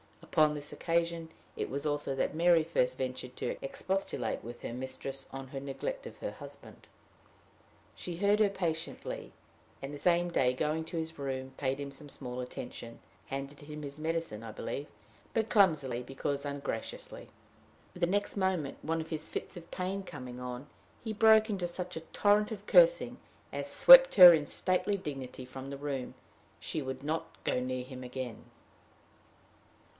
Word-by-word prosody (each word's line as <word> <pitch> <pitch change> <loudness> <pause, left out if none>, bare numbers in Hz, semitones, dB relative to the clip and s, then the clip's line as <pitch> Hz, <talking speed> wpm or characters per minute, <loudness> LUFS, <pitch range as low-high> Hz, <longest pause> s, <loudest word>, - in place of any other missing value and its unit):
Upon 155 -1 +3
this 145 0 -7
occasion 170 -1 -1 0.3
it - - -3
was 140 +2 -3
also 145 -2 -1
that - - 0
Mary 170 0 +5
first 130 -6 +1
ventured 130 -1 -4
to - - -3
expostulate 160 - -2
with 120 +1 -8
her - - -5
mistress 130 +1 -5
on 135 -1 -7
her 135 - -5
neglect 475 - -4
of - - -11
her - - -3
husband. - - -12 1.1
She 175 -2 -6
heard 205 +3 +3
her 210 -2 +5
patiently; 165 -4 -4 0.5
and 135 +2 -5
the 145 - -7
same 175 +2 +3
day, 125 -6 +3
going 155 +5 -1
to 165 - -5
his 160 -1 -4
room, 130 -1 -3
paid 135 0 -1
him 140 -1 -5
some 140 +2 -9
small 125 -2 -6
attention 120 -2 -7 0.3
handed 135 +1 -5
him 150 0 -8
his 140 +1 -7
medicine, 160 -8 -2
I 115 - -8
believe, 145 +2 -4 0.5
but 225 -1 +1
clumsily, 150 - +3
because 140 +3 -3
ungraciously. 140 -5 -5 0.7
The 175 -1 0
next 205 +3 0
moment, 185 -7 0
one 165 +1 -1
of 160 - -8
his 155 -2 -3
fits - - -5
of 170 -1 -11
pain 190 +1 -3
coming 130 -9 -8
on, 125 +1 -5 0.4
he 220 -2 -3
broke 220 0 +6
into 190 -4 -1
such 180 0 -5
a 160 0 -8
torrent 210 +1 +3
of 205 -2 -6
cursing - - +5 0.3
as - - -3
swept - - +9
her 180 -2 +12
in 150 -3 +1
stately 195 +2 0
dignity 135 -6 -6
from 130 +1 -8
the 140 - -5
room. 140 -3 -4 0.4
She 155 - -3
would 130 0 -5
not 155 +2 -1 0.2
go - - +1
near 125 0 -2
him 130 0 -9
again. 125 -2 -6
150 Hz, 165 wpm, -32 LUFS, 130-180 Hz, 1.1 s, her